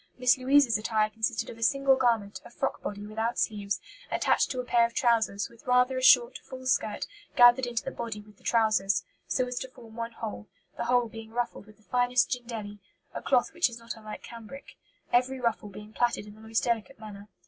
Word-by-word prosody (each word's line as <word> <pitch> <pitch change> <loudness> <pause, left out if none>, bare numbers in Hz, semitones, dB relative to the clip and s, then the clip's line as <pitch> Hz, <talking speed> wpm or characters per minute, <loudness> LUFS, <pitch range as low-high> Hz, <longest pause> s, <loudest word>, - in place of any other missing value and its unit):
Miss 250 0 +4
Louisa's 260 -3 +4
attire 215 -1 +1
consisted 225 +2 -1
of 230 - -12
a - - -13
single 275 +3 +4
garment, 230 -6 0
a - - -12
frock 270 +3 -3
body 205 0 -5
without 225 +2 -2
sleeves, 205 -2 -1 0.3
attached - - +2
to 255 - -3
a - - -1
pair 240 -1 +4
of 235 0 -1
trousers, 225 -5 +2
with 235 +2 -20
rather 250 +1 +3
a 255 - -1
short, 250 -2 +6
full 260 -1 -10
skirt 220 -4 0 0.3
gathered 245 +1 +7
into 235 -1 -2
the 270 - -4
body 230 -4 -5
with 210 -1 -16
the - - -25
trousers, 200 -5 +2 0.2
so 255 - +1
as 250 0 -4
to - - -5
form 230 -3 -15
one 230 0 -5
whole, 105 - -6 0.3
the - - -3
whole 245 0 +3
being 225 0 -10
ruffled 235 -2 -3
with 215 - -17
the 215 - -27
finest 245 +1 +2
jindelly, 225 -5 -5 0.3
a - - -5
cloth 255 +3 +2
which 345 -5 +2
is 235 - -9
not 230 0 -7
unlike 215 -1 -9
cambric, 235 +4 -11 0.4
every 255 +2 +2
ruffle 230 -3 -1
being 210 +2 -11
plaited 240 -3 0
in 210 - -11
the 215 - -16
most 220 0 -1
delicate 235 +2 -1
manner. 210 -2 -10
230 Hz, 215 wpm, -28 LUFS, 215-250 Hz, 0.4 s, gathered